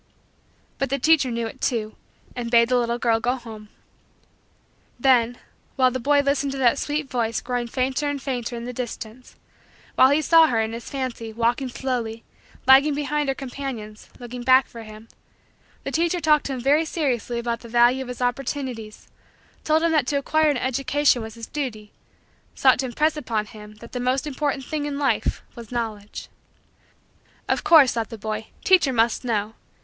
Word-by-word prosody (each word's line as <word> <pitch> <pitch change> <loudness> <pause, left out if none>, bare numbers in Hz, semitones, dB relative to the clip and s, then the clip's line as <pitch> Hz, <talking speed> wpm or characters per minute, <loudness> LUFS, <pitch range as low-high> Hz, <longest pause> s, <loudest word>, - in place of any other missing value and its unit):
But 275 - -1
the 275 - 0
teacher 285 -1 +3
knew 235 -1 -2
it 260 +4 -8
too 220 -4 -1 0.4
and 240 -1 -4
bade 235 0 +4
the 250 - +3
little 235 -1 0
girl 230 -1 +1
go 245 +2 0
home. 220 -4 -11 1.3
Then, 245 -2 +3 0.4
while 255 -2 +3
the 255 - -3
boy 285 +3 +3
listened 280 0 0
to - - -5
that 260 0 +3
sweet 295 0 -2
voice 230 -3 -1
growing 245 -1 -3
fainter 260 +4 -1
and 285 -1 -3
fainter 250 -3 -4
in 235 - -6
the 250 +1 -6
distance; 240 0 -7 0.6
while 260 - +6
he 285 +2 +3
saw 325 +1 +6
her, 235 -6 0
in 220 0 -1
his 230 0 -7
fancy, 255 -4 -4
walking 240 +4 0
slowly, 240 -3 -3 0.4
lagging 275 +3 +6
behind 295 0 -1
her 270 - 0
companions, 250 -6 -7
looking 245 0 -8
back 260 +1 +5
for 230 - -11
him; 215 0 -12 0.8
the - - -4
teacher 340 +2 0
talked 305 -3 +3
to 275 - -3
him 255 - -5
very 285 +5 +3
seriously 265 -7 -2
about 235 0 -2
the 235 - -12
value 240 +3 +4
of 260 - -6
his 250 0 -5
opportunities; 245 -3 -4 0.6
told 315 +1 +2
him 335 - +2
that 300 -5 +2
to 285 - 0
acquire 310 +2 +2
an 285 - +1
education 260 +1 +1
was 220 -1 -8
his 230 -1 -8
duty; 220 -8 -5 0.6
sought 260 -2 +4
to 260 - -1
impress 305 +6 +1
upon 225 -7 -2
him 210 0 -12
that 235 +2 -13
the 250 - -4
most 255 +2 0
important 285 -2 -2
thing 300 +1 -3
in 285 -1 -4
life 275 -6 0
was 235 -1 -11
Knowledge. 220 -4 -5 1.2
Of - - 0
course, 300 -6 +6
thought 230 -1 -3
the 225 - -8
boy, 215 +1 -5 0.2
teacher 360 -8 +4
must 230 0 +1
know. 220 -3 -1
250 Hz, 185 wpm, -23 LUFS, 230-280 Hz, 1.3 s, while